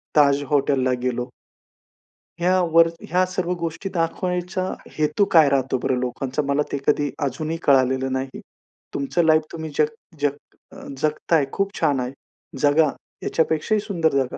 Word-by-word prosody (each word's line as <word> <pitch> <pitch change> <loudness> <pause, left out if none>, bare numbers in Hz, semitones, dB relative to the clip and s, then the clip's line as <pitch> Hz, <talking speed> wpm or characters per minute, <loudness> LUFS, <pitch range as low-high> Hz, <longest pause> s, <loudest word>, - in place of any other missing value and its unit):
ताज 145 -1 +4
हॉटेलला 135 -3 +2
गेलो. 125 0 -2 1.1
ह्यावर 170 -2 +4 0.2
ह्या 180 +2 +3
सर्व 180 -1 -2
गोष्टी 170 +4 -4
दाखवायचा, 180 +2 -1 0.4
हेतू 155 +6 +2
काय 155 -4 +7
राहतो 135 -1 +1
बरं 130 - +1
लोकांचा? 130 +3 -2
मला 140 +1 +2
ते - - -1
कधी 145 -1 +2 0.2
अजूनही 155 +5 -3
कळालेलं 130 -1 +3
नाही. 130 0 -4 0.5
तुमचं 150 +5 0
लाईफ 155 0 +5
तुम्ही 160 -1 -6
जग 150 - +4 0.3
जग 145 -1 +1 0.4
अ, - - -12 0.2
जगताय, 155 +1 +1
खूप 195 0 -1
छान 145 -5 +2
आहे, 125 +1 -3 0.5
जगा. 150 +1 +4 0.3
याच्यापेक्षा 160 +5 +1
ही 210 - +2
सुंदर 175 -7 0
जगा, 135 -2 0
150 Hz, 140 wpm, -22 LUFS, 135-170 Hz, 1.1 s, काय